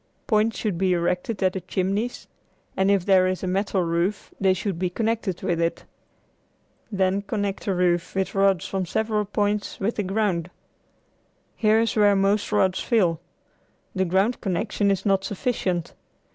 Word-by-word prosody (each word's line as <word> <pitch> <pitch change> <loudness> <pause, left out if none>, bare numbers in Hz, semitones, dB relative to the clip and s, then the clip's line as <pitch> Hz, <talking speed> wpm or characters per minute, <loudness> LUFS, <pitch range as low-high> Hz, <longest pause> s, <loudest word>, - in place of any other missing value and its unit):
Points 220 0 +2
should 200 -6 -2
be 185 -1 +2
erected 180 +4 -1
at 185 -1 +2
the 190 - -4
chimneys, 200 +8 -2 0.5
and 190 +1 +2
if 200 -3 +2
there 185 -2 +5
is 185 0 -2
a - - -1
metal 190 0 0
roof 170 +4 -1
they 190 -1 +4
should 185 -2 -3
be 180 -1 0
connected 220 -2 -2
with 170 -1 0
it. 165 0 -1 1.1
Then 190 0 +1
connect 200 -1 -3
the 195 - 0
roof 175 0 +1
with 190 0 -1
rods 195 -2 +2
from 190 -2 -2
several 215 +2 0
points 205 0 -1
with 205 +4 -1
the - - +1
ground. 190 -4 -1 1.1
Here 215 0 +3
is 230 0 0
where 205 -2 +5
most 200 +2 +1
rods 185 -1 +2
fail. 175 -8 +1 0.7
The 190 -1 0
ground 190 +7 +1
connection 200 +2 0
is 195 0 0
not 195 -1 +2
sufficient. 190 -5 -2
195 Hz, 160 wpm, -24 LUFS, 185-210 Hz, 1.1 s, there